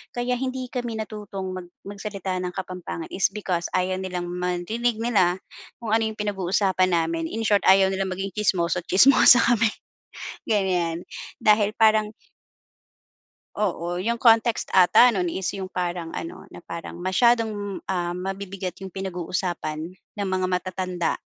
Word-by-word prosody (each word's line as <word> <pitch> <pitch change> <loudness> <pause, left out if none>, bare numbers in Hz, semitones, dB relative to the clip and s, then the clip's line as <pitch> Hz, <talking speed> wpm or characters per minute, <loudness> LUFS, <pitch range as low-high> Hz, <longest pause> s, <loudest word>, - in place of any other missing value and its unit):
kaya 245 +1 -1
hindi 260 -1 -3
kami 240 -3 -3
natutong 205 -3 -5
mag 180 -1 -7 0.2
magsalita 200 -2 -4
ng 180 0 -4
Kapampangan 180 -3 -6
is 190 - +3
because 185 -4 -2
ayaw 185 0 0
nilang 180 -2 -4
marinig 180 +7 -1
nila 200 -7 +2 0.4
kung 230 -3 -5
ano 225 0 +3
yung 220 - -5
pinag-uusapan 190 -2 +1
namin. 165 0 0
In 225 0 -3
short, 205 -1 +4
ayaw 190 0 +6
nilang 190 0 -1
maging 195 +1 -4
tsismoso't 180 -4 0
tsismosa 245 +3 +7
kami, 230 -2 +3 0.8
ganyan. 180 -5 0 0.4
Dahil 210 0 +4
parang 215 -1 +4 1.5
Oo, 175 -3 -2
yung 235 +2 -1
context 230 -1 +4
ata 190 +7 +7
nun 180 -3 0
is 190 +2 -3
yung 190 -1 -5
parang 175 -2 -3
ano, 165 - -7
na - - -11
parang 170 +1 -7
masyadong, 205 +1 +1
ah, 175 -2 -1
mabibigat 190 -1 -5
yung 190 - -6
pinag-uusapan 175 -3 -4
ng 200 +2 -7
mga 185 0 0
matatanda 180 -1 -1
190 Hz, 140 wpm, -24 LUFS, 180-215 Hz, 1.5 s, tsismosa